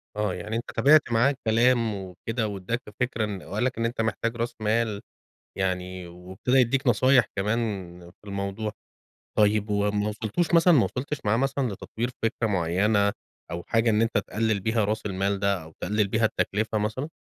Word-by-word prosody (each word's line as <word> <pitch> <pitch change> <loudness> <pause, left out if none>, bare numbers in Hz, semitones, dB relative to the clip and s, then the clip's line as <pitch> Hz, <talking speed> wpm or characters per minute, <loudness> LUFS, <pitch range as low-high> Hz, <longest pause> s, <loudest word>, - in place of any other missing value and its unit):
آه. 105 -3 0
يعني 105 +5 -5
أنت 115 - -4
تابعت 140 +2 +5
معاه 120 +5 +4
الكلام 115 -2 +2
وكده، 100 +4 -4
وادّاك 100 +4 -3 0.2
فكرة 125 -3 0
إن 100 -4 -5
وقال 105 +4 -3
لك 130 - 0
إن 115 - 0
أنت 115 0 -1
محتاج 115 +1 -1
راس 120 0 -3
مال 110 -1 0 0.6
يعني، 90 -1 -2
وابتدى 90 +8 -2
يدّيك 130 +2 +2
نصايح 125 +1 +5
كمان 105 +4 +1 0.5
في 105 - -17
الموضوع. 100 +2 -3 0.7
طيب 105 0 +3
وما 105 0 +1
وصلتوش 110 +11 -1
مثلًا 170 0 +6
ما 125 - +5
وصلتش 140 +3 -3
معاه 105 +2 +2
مثلًا 135 0 0
لتطوير 110 +6 -4
فكرة 115 0 0
معيّنة 100 +3 +2 0.4
أو 85 0 -4
حاجة 115 +1 +3
إن 110 +1 +3
أنت 115 -1 +1
تقلِّل 110 -1 -1
بيها 110 +1 +1
راس 105 +1 -2
المال 100 +1 -1
ده 100 -4 +1
أو 80 0 -13
تقلِّل 105 -1 +1
بيها 110 +2 +1
التكلفة 110 0 0
مثلًا؟ 110 +8 -2
110 Hz, 170 wpm, -26 LUFS, 100-115 Hz, 0.7 s, مثلًا